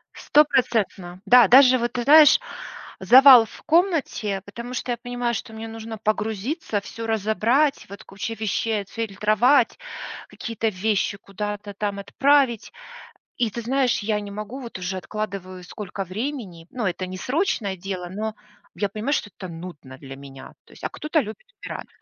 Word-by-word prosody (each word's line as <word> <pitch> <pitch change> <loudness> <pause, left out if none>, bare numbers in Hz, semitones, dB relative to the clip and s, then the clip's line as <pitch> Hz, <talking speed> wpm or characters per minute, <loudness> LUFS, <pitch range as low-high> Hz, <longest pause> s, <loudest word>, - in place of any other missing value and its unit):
Стопроцентно, 225 -11 +1
да. 245 +3 +7
Даже 255 0 +7
вот 240 0 -2
ты 245 -1 -2
знаешь, 300 - +7 0.6
завал 250 +3 +8
в - - -15
комнате, 315 - +1
потому 235 +4 -8
что 250 - -3
я 240 - -1
понимаю, 245 0 -3
что 220 +1 -6
мне 220 +1 -7
нужно 225 0 -7
погрузиться, 215 - -2
всё 225 +2 -7
разобрать, 225 +7 +1
вот 200 - -10
куча 195 +4 -6
вещей, 220 0 -1
отфильтровать, 220 +5 +1 0.5
какие-то 225 -1 -3
вещи 200 0 -1
куда-то 205 +1 -6
там 200 0 -3
отправить. 270 +1 +2 0.7
И 235 -3 +1
ты 235 - -5
знаешь, 255 +1 +1
я 210 0 -1
не 205 -1 -8
могу, 215 +6 -7
вот 235 -6 -8
уже 185 +1 -3
откладываю 185 -2 -6
сколько 195 +1 -6
времени, 195 - -6
ну, 245 -4 -3
это 185 0 -2
не 185 - -7
срочное 250 - -1
дело, 185 -1 -5
но 215 +3 -4 0.4
я 200 +2 -1
понимаю, 220 +8 -2
что 205 - -1
это 185 - -8
нудно 165 -6 -10
для 135 -1 -10
меня. 135 -1 -12
То - - -19
есть, - - -17
а - - -2
кто-то 310 +1 -1
любит 215 -2 -8 0.2
убирать. - - -6
220 Hz, 160 wpm, -23 LUFS, 195-245 Hz, 0.7 s, завал